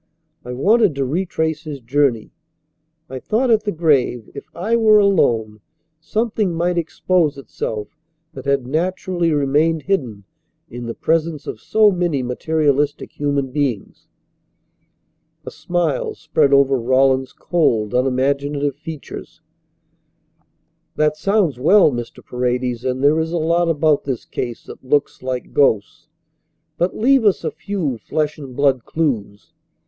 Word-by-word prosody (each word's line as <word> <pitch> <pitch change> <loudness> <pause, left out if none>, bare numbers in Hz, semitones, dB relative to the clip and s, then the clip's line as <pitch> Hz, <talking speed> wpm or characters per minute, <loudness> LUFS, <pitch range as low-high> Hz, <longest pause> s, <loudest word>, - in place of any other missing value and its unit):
I 125 - -6
wanted 200 - +3
to 135 -1 -1
retrace 160 +1 -2
his 150 -3 -6
journey. 125 -2 0 0.8
I 130 -2 -6
thought 235 - 0
at 215 -1 +3
the 205 - 0
grave, 145 - +1
if - - -8
I 215 +7 0
were 220 -2 +5
alone, 115 - +2 0.4
something 210 0 -1
might 175 +2 0
expose 165 -2 0
itself 110 -5 -6 0.4
that 135 -2 -9
had 140 -2 +1
naturally 175 +3 -1
remained 150 +2 +1
hidden 125 - -2 0.5
in 120 0 -7
the 115 - -5
presence 160 -2 -1
of 110 - -7
so 215 -1 +4
many 175 -7 -1
materialistic 145 +2 0
human 140 -2 -1
beings." 135 -7 -3 1.4
A - - -6
smile 175 -5 -2
spread 155 -3 +1
over 140 -1 +4
Rawlins's 130 +2 +2
cold, 120 - 0
unimaginative 140 +2 0
features. 155 0 -9 1.5
"That 150 0 +2
sounds 170 - +1
well, 185 +5 +5
Mr. 120 -2 -7
Paredes, 125 -1 -2
and 130 +1 -2
there 150 +3 +4
is 160 0 -2
a 175 - -1
lot 170 +1 +1
about 155 -2 +2
this 130 -4 -3
case 120 -2 -5
that - - -12
looks 140 +2 0
like 130 -1 -4
ghosts, 110 -8 +1 0.7
but 175 +2 0
leave 265 +2 +4
us 205 -3 +2
a - - -2
few 165 - -3
flesh 150 +6 -2
and 135 -4 -9
blood 135 -3 +2
clues. 115 -11 -3
145 Hz, 135 wpm, -19 LUFS, 130-170 Hz, 1.5 s, were